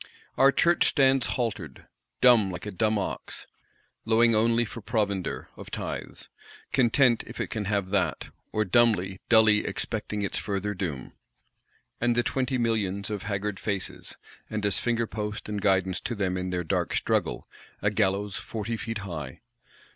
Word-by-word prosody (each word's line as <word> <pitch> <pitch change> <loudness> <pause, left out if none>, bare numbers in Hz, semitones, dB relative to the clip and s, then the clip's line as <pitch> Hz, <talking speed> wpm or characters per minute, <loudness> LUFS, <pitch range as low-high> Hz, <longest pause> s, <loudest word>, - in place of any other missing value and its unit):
Our 135 +1 +6
Church 170 +4 +3
stands 135 -3 +3
haltered, 105 - -3 0.4
dumb, 120 -6 +6
like 90 +2 -6
a 105 - -4
dumb 110 +3 +1
ox; 100 - -5 0.6
lowing 115 +1 +4
only 115 +2 +3
for 115 +2 -8
provender 100 -4 -2
(of - - -10
tithes); - - -5 0.5
content 125 -1 +4
if - - -9
it - - -3
can 105 -2 -3
have 100 -2 -1
that; 90 -8 0 0.2
or, 110 0 0
dumbly, 95 -3 +2
dully 110 -2 +6
expecting 105 -2 -3
its 100 - -1
further 100 0 -2
doom. 80 -10 -4 0.9
And 120 0 +2
the 120 - +2
Twenty 130 0 -1
Millions 105 -4 -1
of 105 -2 -3
"haggard 100 0 -3
faces;" 100 -3 -4 0.3
and, 105 -1 -2
as 100 - +2
finger 115 -1 0
post 105 -1 -5
and 105 -1 -3
guidance 95 -2 +2
to 120 - -3
them 95 -3 -1
in 90 0 -3
their 90 -1 -2
dark 80 - -1
struggle, - - 0 0.3
"a 105 - +1
gallows 100 -1 0
forty 115 +1 -4
feet 115 0 -4
high"! 75 -8 -6
105 Hz, 155 wpm, -27 LUFS, 95-115 Hz, 0.9 s, Our